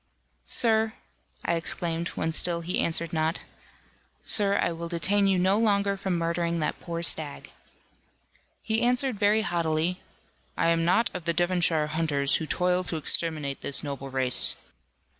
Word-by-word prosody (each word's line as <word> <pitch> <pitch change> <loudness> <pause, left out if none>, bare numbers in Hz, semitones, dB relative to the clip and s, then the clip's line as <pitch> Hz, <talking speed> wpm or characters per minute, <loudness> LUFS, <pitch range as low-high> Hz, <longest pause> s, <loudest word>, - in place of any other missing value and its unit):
"Sir," 220 -1 +2 0.5
I 170 - +1
exclaimed, 165 0 -2
when 160 0 -1
still 170 +1 +2
he 175 +2 -2
answered 170 +1 -1
not, 160 +1 0 0.8
"Sir, 200 -1 +3
I - - +1
will 170 0 -6
detain 195 +4 +2
you 195 -1 +2
no 190 +3 +2
longer 200 -3 +2
from 190 -2 -2
murdering 170 0 -1
that 150 - -2
poor 170 -1 -5
stag." 155 -4 0 1.1
He 220 0 0
answered 250 -2 +2
very 215 +1 +3
haughtily, 170 0 -1 0.6
"I - - +2
am 165 0 +2
not 185 +7 +2
of 180 -2 -6
the 170 - +1
Devonshire 175 -2 +2
hunters, 150 -3 +1
who 160 - -5
toil 180 +2 +1
to 165 - -2
exterminate 155 -3 -2
this 140 - 0
noble 140 -2 -5
race." 130 -1 +2
170 Hz, 150 wpm, -26 LUFS, 160-195 Hz, 1.1 s, Sir